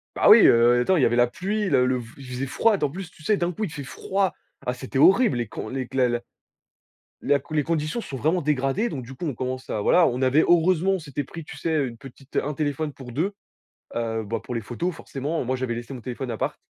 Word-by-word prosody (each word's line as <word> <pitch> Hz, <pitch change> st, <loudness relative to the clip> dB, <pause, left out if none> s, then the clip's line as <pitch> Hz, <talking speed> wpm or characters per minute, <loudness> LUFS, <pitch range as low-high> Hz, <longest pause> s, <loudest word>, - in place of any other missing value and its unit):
Bah -, -, +3 dB
oui, -, -, +9 dB
heu, 120 Hz, +1 st, +5 dB
attends, 185 Hz, +9 st, +3 dB
il 145 Hz, -, +2 dB
y -, -, +6 dB
avait 120 Hz, -, +1 dB
la 120 Hz, 0 st, +5 dB
pluie, 200 Hz, -, -2 dB
le 125 Hz, -4 st, +3 dB
le 130 Hz, 0 st, +1 dB
v 120 Hz, -, -8 dB
il 135 Hz, -, -10 dB
faisait 125 Hz, +2 st, -4 dB
froid. 210 Hz, -, +2 dB
D -, -, -2 dB
en 140 Hz, -, +1 dB
plus, 180 Hz, +1 st, -7 dB
sais 210 Hz, -, +3 dB
d'un 175 Hz, -1 st, 0 dB
coup, 215 Hz, +6 st, -3 dB
il 165 Hz, -, -5 dB
fait 150 Hz, -1 st, -6 dB
froid. 190 Hz, +9 st, -1 dB, 0.3 s
Ah 125 Hz, -, 0 dB
c'était 130 Hz, +1 st, -5 dB
horrible 195 Hz, -, +5 dB
les 120 Hz, -3 st, -2 dB
con 110 Hz, -, -6 dB
les 130 Hz, 0 st, -4 dB
c 135 Hz, -, -3 dB
a 125 Hz, -1 st, +4 dB
la 120 Hz, 0 st, -1 dB, 1.0 s
la 145 Hz, 0 st, +2 dB
les 150 Hz, -1 st, +2 dB
conditions 160 Hz, -, -1 dB
se -, -, -10 dB
sont 135 Hz, -, -5 dB
vraiment 165 Hz, +4 st, +1 dB
dégradées 145 Hz, -, 0 dB
donc 130 Hz, -4 st, -5 dB
du 135 Hz, -, -9 dB
coup 175 Hz, -, -7 dB
on 145 Hz, -, -1 dB
commence 130 Hz, +1 st, -4 dB
à 105 Hz, -, -1 dB
voilà, 175 Hz, +11 st, +5 dB
on 125 Hz, +1 st, -1 dB
avait 135 Hz, +4 st, +4 dB
heureusement 175 Hz, +2 st, +3 dB
on 190 Hz, -, +1 dB
s'était 145 Hz, -3 st, -5 dB
pris 165 Hz, +4 st, -9 dB
tu 145 Hz, -, -10 dB
sais 150 Hz, -2 st, 0 dB
une 115 Hz, -, -10 dB
petite 135 Hz, +1 st, -13 dB
un 150 Hz, -, 0 dB
téléphone 150 Hz, 0 st, -2 dB
pour 125 Hz, -3 st, -10 dB
2, 175 Hz, -, -1 dB, 0.6 s
heu, 115 Hz, -1 st, -1 dB
bah 110 Hz, +2 st, -3 dB
pour -, -, -6 dB
les 115 Hz, -, -2 dB
photos 165 Hz, -, -3 dB
forcément. 145 Hz, 0 st, -4 dB
Moi 130 Hz, +2 st, -1 dB
j'avais 130 Hz, -2 st, -2 dB
laissé 120 Hz, +3 st, -7 dB
mon 120 Hz, -, -8 dB
téléphone 125 Hz, +1 st, -5 dB
à 115 Hz, -, -2 dB
appart -, -, -3 dB
135 Hz, 265 wpm, -24 LUFS, 125-165 Hz, 1.0 s, oui